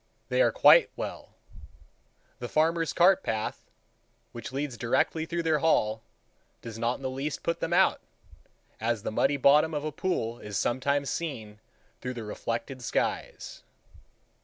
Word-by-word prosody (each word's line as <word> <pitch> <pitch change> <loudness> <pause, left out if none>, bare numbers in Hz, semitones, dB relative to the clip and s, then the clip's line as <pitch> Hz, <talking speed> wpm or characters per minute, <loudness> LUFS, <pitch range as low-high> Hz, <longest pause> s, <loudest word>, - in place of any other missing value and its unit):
They - - +2
are - - +4
quite - - +6
well. - - -7 1.0
The - - -5
farmer's 165 +1 +1
cart 180 +2 +4
path, 110 -1 -3 0.7
which 120 0 -8
leads 135 -1 -3
directly 160 +7 0
through 170 0 -2
their 160 -2 +2
hall, 110 -8 +2 0.6
does 115 -1 -7
not 120 +2 0
in - - -12
the 130 - -1
least 140 +3 -4
put 170 - -1
them 165 - -3
out, 185 +2 +3 0.8
as 115 -1 -1
the - - -3
muddy 135 +6 +2
bottom 150 +4 +4
of 145 - -2
a 155 - -3
pool 125 -9 -2
is 105 -2 -5
sometimes 140 +2 0
seen 110 -11 -5 0.4
through 125 0 -4
the 115 - -5
reflected 115 +4 -4
skies. - - -3
140 Hz, 150 wpm, -28 LUFS, 115-160 Hz, 1.0 s, quite